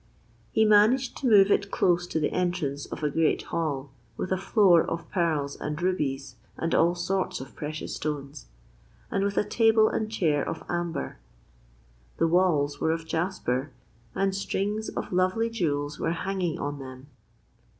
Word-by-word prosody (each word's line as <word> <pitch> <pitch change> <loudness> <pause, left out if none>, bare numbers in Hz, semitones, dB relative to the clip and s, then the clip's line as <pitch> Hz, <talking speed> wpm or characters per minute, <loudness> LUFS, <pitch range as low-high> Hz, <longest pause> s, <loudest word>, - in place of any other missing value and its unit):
He 220 - +3
managed 220 +5 +4
to 270 - -1
move 205 -3 +6
it 200 0 +2
close 175 -2 +2
to 160 - -1
the 150 - 0
entrance 175 -6 -1
of - - -7
a 150 - +2
great 165 +2 +1
hall, 145 -5 -3 0.3
with 185 - -4
a 190 - +2
floor 190 -4 +5
of 165 -1 -4
pearls 155 -6 0
and 150 +1 -4
rubies 140 -8 -2 0.2
and 165 - -2
all 170 +2 +4
sorts 185 +2 -1
of 130 - -10
precious 155 +1 -5
stones, 145 -4 -5 0.6
and 195 - 0
with 200 0 -1
a - - +4
table 220 0 +4
and 215 0 -2
chair 155 -9 +1
of 165 - -5
amber. 175 - -3 1.0
The - - +3
walls 160 -5 +2
were - - +2
of 165 0 -3
jasper, 160 -6 -2 0.4
and 195 0 +1
strings 205 +2 -2
of - - -5
lovely 185 +6 +1
jewels 145 -8 -2
were 165 - 0
hanging 180 -2 -2
on 145 0 -4
them. 130 0 -9
170 Hz, 160 wpm, -27 LUFS, 145-195 Hz, 1.0 s, move